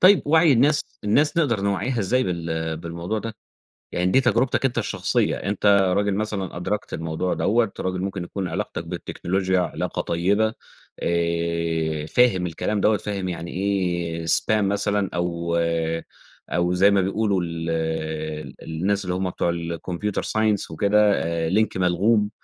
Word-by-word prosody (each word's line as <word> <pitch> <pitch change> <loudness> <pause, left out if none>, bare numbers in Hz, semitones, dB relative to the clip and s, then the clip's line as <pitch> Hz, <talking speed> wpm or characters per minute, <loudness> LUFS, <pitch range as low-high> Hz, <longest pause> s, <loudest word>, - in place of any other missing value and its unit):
طيب 190 +1 +7
وعي 160 +1 +5
الناس 145 +5 +2
الناس 145 - +2
نقدر 135 -11 +2
نوَعِّيها 100 +5 -1
إزاي 120 +5 +2
بال 80 -2 -2
بالموضوع 85 +6 -4
ده؟ 115 0 -6 0.6
يعني 90 +1 0
دي 130 - +5
تجربتك 130 +1 +2
أنت 130 -2 0
الشخصية، 100 -4 0
أنت 100 +1 -3
راجل 100 0 +4
مثلًا 100 -4 -3
أدركت 100 +4 -3
الموضوع 80 +3 -2
دوّة، 115 0 +1
راجل 95 0 -2
ممكن 95 -1 -3
يكون 95 +1 -4
علاقتك 80 0 -4
بالتكنولوجيا 95 +2 -1
علاقة 90 - -2
طيبة، 100 +6 +1 0.5
آآ 85 -2 -1
فاهم 95 0 +3
الكلام 95 +5 -2
دوّة، 110 -1 +4
فاهم 100 -2 -3
يعني 85 -1 -5
إيه 90 -4 -1
spam 110 +5 +3
مثلًا، 100 0 +1
أو 85 -1 -1 0.9
أو 90 0 +1
زي 95 +3 +5
ما 100 -1 +3
بيقولوا 100 0 0
ال 85 0 -4 0.9
الناس 95 +5 -1
اللي 90 0 -1
هم 95 0 -1
بتوع 85 - -1
الComputer 85 +4 -3
Science 110 -5 0
وكده، 105 +5 +3
آآ 80 -2 -1
لينك 110 +1 +1
ملغُوم، 100 +4 +2
95 Hz, 140 wpm, -23 LUFS, 85-105 Hz, 0.9 s, طيب